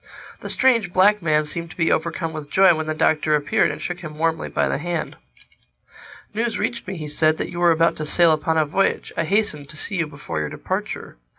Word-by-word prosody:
The -, -, -7 dB
strange 230 Hz, -8 st, +3 dB
black 200 Hz, +3 st, +4 dB
man 155 Hz, -2 st, +2 dB
seemed 170 Hz, +3 st, -5 dB
to -, -, -13 dB
be 165 Hz, -2 st, +2 dB
overcome 165 Hz, 0 st, -1 dB
with 155 Hz, -2 st, -7 dB
joy 190 Hz, +1 st, +5 dB
when 160 Hz, -1 st, -3 dB
the 155 Hz, -, -2 dB
Doctor 155 Hz, -1 st, +2 dB
appeared 145 Hz, -1 st, +1 dB
and -, -, -5 dB
shook 175 Hz, 0 st, -5 dB
him 155 Hz, -3 st, -9 dB
warmly 165 Hz, 0 st, -1 dB
by -, -, 0 dB
the -, -, -1 dB
hand. 170 Hz, +1 st, -3 dB, 1.2 s
"News 225 Hz, 0 st, -1 dB
reached 235 Hz, -4 st, -3 dB
me," 190 Hz, -1 st, -5 dB
he 155 Hz, -2 st, -6 dB
said, 155 Hz, +1 st, +2 dB
"that -, -, -4 dB
you 175 Hz, -, -6 dB
were 175 Hz, 0 st, +4 dB
about 165 Hz, +1 st, +2 dB
to 155 Hz, -, -4 dB
sail 170 Hz, +1 st, +5 dB
upon 160 Hz, +1 st, 0 dB
a 155 Hz, -, +3 dB
voyage. 190 Hz, +7 st, -1 dB
I 165 Hz, -, 0 dB
hastened 155 Hz, -7 st, 0 dB
to 150 Hz, -, -7 dB
see 195 Hz, +4 st, -3 dB
you 170 Hz, -3 st, 0 dB
before 140 Hz, -, -6 dB
your 75 Hz, -1 st, -2 dB
departure. -, -, -5 dB
165 Hz, 225 wpm, -22 LUFS, 155-180 Hz, 1.2 s, joy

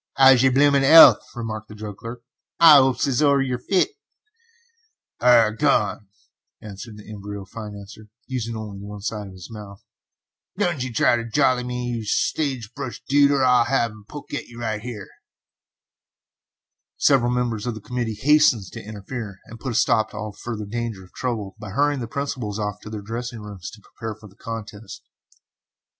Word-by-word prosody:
"'Ow's 135 Hz, -2 st, +7 dB
yer 135 Hz, -, +5 dB
bloomin' 140 Hz, +1 st, +4 dB
'ealth?" 140 Hz, -5 st, +9 dB, 0.2 s
remarked 110 Hz, -2 st, -5 dB
the 105 Hz, -, -11 dB
drug 105 Hz, -2 st, -8 dB
clerk. 115 Hz, +2 st, -9 dB, 0.4 s
"Hi 160 Hz, -4 st, +9 dB
'opes 130 Hz, -1 st, +2 dB
as 135 Hz, -2 st, 0 dB
'ow 140 Hz, -2 st, +4 dB
yer 130 Hz, -2 st, -1 dB
fit." 190 Hz, -, +2 dB, 1.3 s
"Ah 120 Hz, -2 st, +6 dB
h -, -, -7 dB
h, 115 Hz, -, -15 dB
go 145 Hz, -, +3 dB
arn," 105 Hz, -4 st, 0 dB, 0.5 s
answered 105 Hz, +1 st, -10 dB
the 105 Hz, -, -13 dB
embryo 100 Hz, -1 st, -8 dB
financier, 105 Hz, 0 st, -10 dB, 0.2 s
using 115 Hz, -3 st, -4 dB
only 105 Hz, -3 st, -7 dB
one 100 Hz, 0 st, -9 dB
side 105 Hz, -1 st, -4 dB
of 95 Hz, -, -11 dB
his 95 Hz, +3 st, -12 dB
mouth, 100 Hz, -2 st, -10 dB, 0.7 s
"don't 175 Hz, -8 st, 0 dB
try 125 Hz, 0 st, +2 dB
ter 115 Hz, -, -4 dB
jolly 130 Hz, 0 st, +2 dB
me, 125 Hz, 0 st, -3 dB
yer -, -, -6 dB
sage 125 Hz, +1 st, -1 dB
brush 135 Hz, -4 st, -7 dB
dude, 140 Hz, 0 st, +5 dB
or 140 Hz, -2 st, +2 dB
I'll 125 Hz, -2 st, +4 dB
give 120 Hz, -4 st, 0 dB
yer 105 Hz, -, -14 dB
a -, -, -22 dB
poke 145 Hz, -, -9 dB, 0.3 s
right 110 Hz, -3 st, -3 dB
here." 110 Hz, -4 st, -7 dB, 1.9 s
Several 130 Hz, -4 st, +3 dB
members 120 Hz, -3 st, -1 dB
of 120 Hz, -, -2 dB
the -, -, -7 dB
committee 120 Hz, 0 st, -4 dB
hastened 135 Hz, -8 st, +3 dB
to -, -, -8 dB
interfere, 105 Hz, 0 st, -7 dB
and 115 Hz, -, -12 dB
put 130 Hz, -3 st, -4 dB
a -, -, -5 dB
stop 110 Hz, -1 st, +2 dB
to -, -, -10 dB
all 105 Hz, 0 st, -5 dB
further 110 Hz, 0 st, -6 dB
danger 115 Hz, -2 st, -4 dB
of 90 Hz, -, -19 dB
trouble 110 Hz, -6 st, -4 dB
by 105 Hz, -, -8 dB
hurrying 145 Hz, +6 st, +1 dB
the 120 Hz, -, -4 dB
principals 125 Hz, -5 st, -4 dB
off 105 Hz, -1 st, -3 dB
to -, -, -9 dB
their 105 Hz, -2 st, -6 dB
dressing 120 Hz, +2 st, -5 dB
rooms 100 Hz, -3 st, -8 dB
to 110 Hz, -, -14 dB
prepare 110 Hz, +1 st, -7 dB
for 110 Hz, 0 st, -14 dB
the 100 Hz, -, -20 dB
contest. 110 Hz, -2 st, -8 dB
115 Hz, 180 wpm, -23 LUFS, 105-130 Hz, 1.9 s, ealth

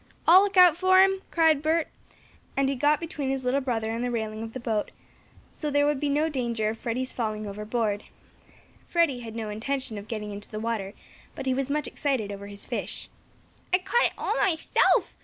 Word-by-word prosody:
"I'll 360 Hz, +3 st, +9 dB
look 400 Hz, -1 st, -1 dB
out 360 Hz, -3 st, +8 dB
for 375 Hz, +2 st, +4 dB
him!" 385 Hz, 0 st, +1 dB
cried 320 Hz, -3 st, +3 dB
Bert, 315 Hz, +1 st, +1 dB, 0.7 s
and 275 Hz, -1 st, +2 dB
he -, -, +1 dB
got 290 Hz, +3 st, +3 dB
between 300 Hz, -5 st, -4 dB
his 265 Hz, -1 st, -2 dB
little 265 Hz, +3 st, +2 dB
brother 225 Hz, -4 st, -1 dB
and 230 Hz, +2 st, -2 dB
the 245 Hz, -, -1 dB
railing 220 Hz, -2 st, -3 dB
of 225 Hz, 0 st, -6 dB
the 260 Hz, -, -5 dB
boat, 220 Hz, -3 st, -1 dB, 0.6 s
so 300 Hz, -, -5 dB
there 290 Hz, 0 st, +3 dB
would 295 Hz, -2 st, +1 dB
be 290 Hz, -, 0 dB
no 295 Hz, +3 st, +2 dB
danger 235 Hz, -7 st, -1 dB
of 220 Hz, 0 st, -5 dB
Freddie's 255 Hz, +2 st, -3 dB
falling 215 Hz, -3 st, -3 dB
overboard. 210 Hz, +1 st, -2 dB, 0.8 s
Freddie 335 Hz, -7 st, +2 dB
had 225 Hz, -2 st, -8 dB
no 220 Hz, -2 st, -4 dB
intention 230 Hz, +1 st, -3 dB
of 200 Hz, -, -11 dB
getting 210 Hz, -2 st, -4 dB
into 205 Hz, 0 st, -9 dB
the 215 Hz, -, -5 dB
water, 215 Hz, -3 st, -3 dB, 0.4 s
but -, -, -6 dB
he 260 Hz, -, +2 dB
was 270 Hz, +1 st, -1 dB
much 295 Hz, 0 st, 0 dB
excited 260 Hz, -9 st, -1 dB
over 200 Hz, 0 st, -7 dB
his 200 Hz, 0 st, -4 dB
fish. -, -, -4 dB, 0.6 s
"I 365 Hz, -, +5 dB
caught 475 Hz, +6 st, +2 dB
it -, -, 0 dB
all -, -, -1 dB
myself!" 345 Hz, -5 st, +2 dB
255 Hz, 205 wpm, -26 LUFS, 220-300 Hz, 0.8 s, I'll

